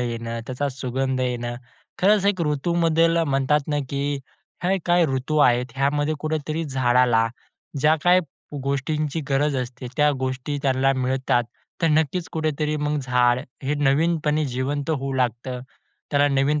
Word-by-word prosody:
येणं, 115 Hz, -1 st, -3 dB
त्याचा 130 Hz, +3 st, -2 dB
सुगंध 130 Hz, 0 st, -2 dB
येणं. 120 Hz, -1 st, -2 dB, 0.4 s
खरंच, 200 Hz, +1 st, +4 dB
एक 200 Hz, -3 st, +1 dB
ऋतूमध्ये 165 Hz, +2 st, +2 dB, 0.2 s
म्हणतात 140 Hz, +1 st, +1 dB
ना, 150 Hz, -, 0 dB
की 140 Hz, 0 st, -1 dB, 0.5 s
हे 190 Hz, +2 st, +2 dB
काही 175 Hz, 0 st, +4 dB
ऋतू 130 Hz, +4 st, -2 dB
आहेत. 125 Hz, -3 st, +4 dB
ह्यामध्ये 145 Hz, +3 st, +1 dB
कुठेतरी 155 Hz, +1 st, -2 dB
झाडाला 125 Hz, -4 st, +3 dB, 0.5 s
ज्या 155 Hz, +2 st, +5 dB
काही 180 Hz, +1 st, +6 dB, 0.4 s
गोष्टींची 145 Hz, +3 st, -1 dB
गरज 140 Hz, +1 st, +1 dB
असते, 125 Hz, 0 st, -5 dB
त्या 150 Hz, 0 st, +4 dB
गोष्टी 130 Hz, +2 st, -2 dB
त्यांना 135 Hz, 0 st, +2 dB
मिळतात. 130 Hz, -1 st, 0 dB, 0.4 s
तर -, -, +4 dB
नक्कीच 160 Hz, +2 st, +1 dB
कुठेतरी 155 Hz, -1 st, -1 dB
मग 150 Hz, 0 st, -1 dB
झाड 125 Hz, -2 st, +2 dB, 0.3 s
हे 140 Hz, +3 st, 0 dB
नवीनपणे 150 Hz, +1 st, +1 dB
जिवंत 135 Hz, +4 st, -2 dB
होऊ 135 Hz, -3 st, -2 dB
लागतं. 125 Hz, 0 st, -1 dB, 0.5 s
त्याला 145 Hz, 0 st, +3 dB
नवीन 140 Hz, +2 st, +2 dB
140 Hz, 135 wpm, -23 LUFS, 130-155 Hz, 0.5 s, काही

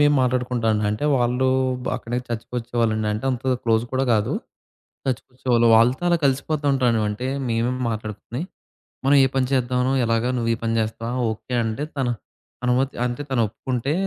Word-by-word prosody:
మేము 145 Hz, 0 st, +5 dB
మాట్లాడుకుంటామండి. 120 Hz, -4 st, +1 dB
అంటే 105 Hz, +8 st, -2 dB
వాళ్ళు 125 Hz, +1 st, +1 dB, 0.4 s
బ -, -, -8 dB
అక్కడి 115 Hz, -, -9 dB
నుంచి 125 Hz, 0 st, -2 dB
చర్చికొచ్చేవాళ్ళండి. 115 Hz, -2 st, -1 dB
అంటే 105 Hz, +4 st, -4 dB
అంత 130 Hz, 0 st, 0 dB
క్లోజ్ 115 Hz, 0 st, +2 dB
కూడా 130 Hz, +1 st, +1 dB
కాదు. 105 Hz, -1 st, +1 dB, 0.7 s
చర్చికొచ్చేవాళ్ళు. 125 Hz, -1 st, 0 dB
వాళ్ళతో 125 Hz, +7 st, +3 dB
అలా 170 Hz, -1 st, +3 dB
కలిసిపోతూ 140 Hz, +2 st, 0 dB
ఉంటామండీ. 125 Hz, -4 st, +2 dB
అంటే 115 Hz, +5 st, -4 dB, 0.2 s
మేమే 115 Hz, +2 st, +1 dB, 0.2 s
మాట్లాడుకొని, 110 Hz, -, -5 dB, 0.6 s
మనం 145 Hz, -, +6 dB
ఏ -, -, +4 dB
పని 130 Hz, -1 st, +2 dB
చేద్దామనో 125 Hz, 0 st, +1 dB
ఎలాగా 115 Hz, +1 st, +1 dB
నువ్వు 115 Hz, -1 st, 0 dB
ఈ -, -, -5 dB
పని 115 Hz, 0 st, 0 dB
చేస్తావా? 110 Hz, +2 st, -3 dB, 0.2 s
ఓకే. 125 Hz, +3 st, -7 dB
అంటే 115 Hz, +6 st, -2 dB
తను 125 Hz, -3 st, 0 dB, 0.5 s
అనుమతి 130 Hz, +2 st, +1 dB
అంటే 125 Hz, +3 st, -2 dB
తను 130 Hz, -3 st, +1 dB
ఒప్పుకుంటే 125 Hz, +5 st, -3 dB
120 Hz, 160 wpm, -23 LUFS, 115-130 Hz, 0.7 s, మనం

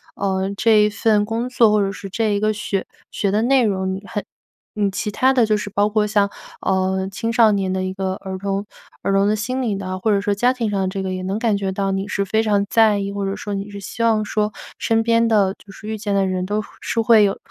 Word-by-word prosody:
呃， 190 Hz, -1 st, -1 dB
这 215 Hz, +1 st, +4 dB
一 -, -, +2 dB
份 210 Hz, 0 st, +2 dB
工 230 Hz, +3 st, -2 dB
作， 235 Hz, -3 st, +4 dB
或 210 Hz, -, +3 dB
者 195 Hz, -1 st, 0 dB
是 195 Hz, 0 st, -8 dB
这 215 Hz, +2 st, 0 dB
一 -, -, 0 dB
个 215 Hz, +1 st, +1 dB
学 200 Hz, -2 st, -3 dB, 0.3 s
学 200 Hz, -, -1 dB
的 210 Hz, +2 st, +2 dB
内 255 Hz, +1 st, +3 dB
容。 190 Hz, -2 st, -1 dB
你 190 Hz, -, -5 dB
很 205 Hz, -, -4 dB, 0.5 s
你 205 Hz, -1 st, +1 dB
其 210 Hz, +2 st, -3 dB
他 260 Hz, +5 st, +3 dB
的 245 Hz, -3 st, +4 dB
就 215 Hz, -1 st, +2 dB
是 210 Hz, -1 st, -5 dB
包 205 Hz, +1 st, +1 dB
括 215 Hz, 0 st, +1 dB
像， 205 Hz, -1 st, +2 dB, 0.3 s
呃， 190 Hz, 0 st, 0 dB
青 225 Hz, +4 st, -3 dB
少 225 Hz, -1 st, +5 dB
年 195 Hz, -2 st, 0 dB
的 185 Hz, -, -1 dB
一 185 Hz, 0 st, -3 dB
个 190 Hz, -1 st, -2 dB
儿 190 Hz, 0 st, -6 dB
童 195 Hz, +1 st, -2 dB, 0.4 s
儿 -, -, -1 dB
童 195 Hz, +1 st, +3 dB
的 215 Hz, -, +2 dB
心 255 Hz, +5 st, -2 dB
理 220 Hz, -5 st, -1 dB
的， 185 Hz, -1 st, -4 dB
或 220 Hz, -, 0 dB
者 200 Hz, -, +2 dB
说 205 Hz, 0 st, 0 dB
家 245 Hz, +5 st, +2 dB
庭 235 Hz, -4 st, -2 dB
上 200 Hz, -1 st, -1 dB
的 190 Hz, -, 0 dB
这 190 Hz, +1 st, -3 dB
个 190 Hz, -, -3 dB
也 185 Hz, -, -4 dB
能 195 Hz, +3 st, -2 dB
感 225 Hz, -3 st, +1 dB
觉 195 Hz, -1 st, -2 dB
到 195 Hz, 0 st, -1 dB
你 195 Hz, +1 st, -2 dB
是 200 Hz, -1 st, -1 dB
非 220 Hz, +3 st, +1 dB
常 205 Hz, -2 st, +2 dB
在 220 Hz, -3 st, +4 dB
意， 200 Hz, 0 st, -3 dB
或 200 Hz, 0 st, -3 dB
者 195 Hz, 0 st, -2 dB
说 205 Hz, -, -5 dB
你 200 Hz, +1 st, -4 dB
是 200 Hz, -1 st, -8 dB
希 230 Hz, +4 st, -4 dB
望 220 Hz, -2 st, +3 dB
说 210 Hz, 0 st, -1 dB, 0.2 s
身 225 Hz, 0 st, +1 dB
边 230 Hz, 0 st, +3 dB
的 205 Hz, -4 st, +3 dB
就 200 Hz, -, -16 dB
是 215 Hz, -, -11 dB
遇 220 Hz, -, -3 dB
见 205 Hz, -1 st, -2 dB
的 195 Hz, -1 st, +2 dB
人 185 Hz, -1 st, -1 dB
都 210 Hz, +2 st, -1 dB, 0.2 s
是 230 Hz, -, -1 dB
会 225 Hz, -1 st, +6 dB
有 195 Hz, -, -1 dB
205 Hz, 290 characters per minute, -20 LUFS, 195-220 Hz, 0.5 s, 会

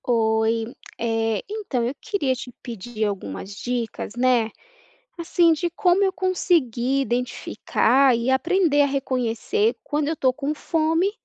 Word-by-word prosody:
Oi, 225 Hz, -1 st, +1 dB, 0.3 s
eh, 225 Hz, -2 st, 0 dB
então, 390 Hz, -, -2 dB
eu 245 Hz, -, -1 dB
queria 395 Hz, -12 st, 0 dB
te 255 Hz, -1 st, -7 dB
pedir 230 Hz, -1 st, -4 dB
algumas 190 Hz, -, -5 dB
dicas, 235 Hz, -1 st, -4 dB
né, 245 Hz, -2 st, +2 dB, 0.7 s
assim, 335 Hz, 0 st, +3 dB
de 345 Hz, +2 st, -2 dB
como 360 Hz, +3 st, +2 dB
eu 380 Hz, -, +1 dB
conseguir 320 Hz, -, +1 dB
identificar 255 Hz, +1 st, +1 dB
e 235 Hz, +2 st, -1 dB
aprender 310 Hz, +2 st, +3 dB
a -, -, +4 dB
reconhecer 270 Hz, -, 0 dB
quando 295 Hz, 0 st, -1 dB
eu 320 Hz, -, -1 dB
tô 260 Hz, -2 st, +3 dB
com 280 Hz, +3 st, -3 dB
fome 325 Hz, +4 st, +1 dB
260 Hz, 135 wpm, -23 LUFS, 235-330 Hz, 0.7 s, a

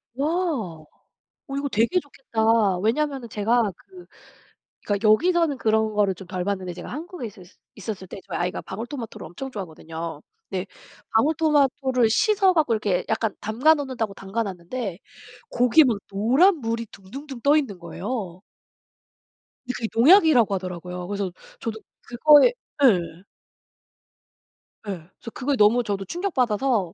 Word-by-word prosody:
와. 275 Hz, +3 st, 0 dB, 1.2 s
어 275 Hz, -, -5 dB
이거 280 Hz, 0 st, -1 dB
되게 235 Hz, -, +2 dB
좋겠다. 225 Hz, -, +1 dB
왜냐면은 255 Hz, +4 st, -1 dB
제가 220 Hz, +1 st, +1 dB
그 365 Hz, -, -15 dB, 0.8 s
그러니까 205 Hz, +1 st, +1 dB
여기서는 330 Hz, +4 st, +3 dB
그런 220 Hz, -1 st, +1 dB
거를 205 Hz, -2 st, +2 dB
좀 185 Hz, 0 st, -12 dB
덜 180 Hz, -1 st, -3 dB
봤는데 190 Hz, -2 st, -3 dB
제가 175 Hz, -, -9 dB
한국에 320 Hz, 0 st, -6 dB
있었을 190 Hz, -4 st, -14 dB, 0.3 s
있었을 205 Hz, -2 st, -6 dB
때 195 Hz, -, -8 dB
저희 -, -, -4 dB
아이가 180 Hz, +1 st, -2 dB
방울토마토를 230 Hz, +4 st, -7 dB
엄청 265 Hz, +11 st, -7 dB
좋아하거든요. 165 Hz, -, -7 dB, 0.3 s
근데 190 Hz, -1 st, -3 dB, 0.5 s
방울토마토를 270 Hz, -2 st, +2 dB
씻어갖고 370 Hz, -, +3 dB
이렇게 205 Hz, -4 st, 0 dB
약간 220 Hz, -1 st, 0 dB
담가 250 Hz, +9 st, +3 dB
놓는다고 260 Hz, -8 st, -3 dB
담가놨는데 195 Hz, 0 st, -4 dB, 0.5 s
거기에 250 Hz, +6 st, +5 dB
막 235 Hz, -5 st, +1 dB
노란 260 Hz, -, +4 dB
물이 230 Hz, -3 st, -3 dB
둥둥둥 255 Hz, +7 st, -10 dB
떠 285 Hz, +4 st, +4 dB
있는 230 Hz, -11 st, -2 dB
거예요. 180 Hz, +1 st, -5 dB, 1.2 s
근데 250 Hz, -, -3 dB
그게 230 Hz, -, -3 dB
농약이라고 280 Hz, -, +6 dB
하더라고요. 180 Hz, -1 st, -6 dB
그래서 200 Hz, -2 st, -3 dB, 0.3 s
저도 220 Hz, -1 st, -4 dB, 0.2 s
그거에 295 Hz, -, +6 dB, 0.3 s
예예. 180 Hz, -7 st, +3 dB, 1.6 s
예. -, -, -2 dB
그래서 180 Hz, +6 st, -11 dB
그거 275 Hz, +2 st, -1 dB
너무 235 Hz, +2 st, +4 dB
저도 200 Hz, -3 st, -3 dB
충격받아서 250 Hz, -, 0 dB
225 Hz, 330 characters per minute, -24 LUFS, 195-275 Hz, 1.6 s, 농약이라고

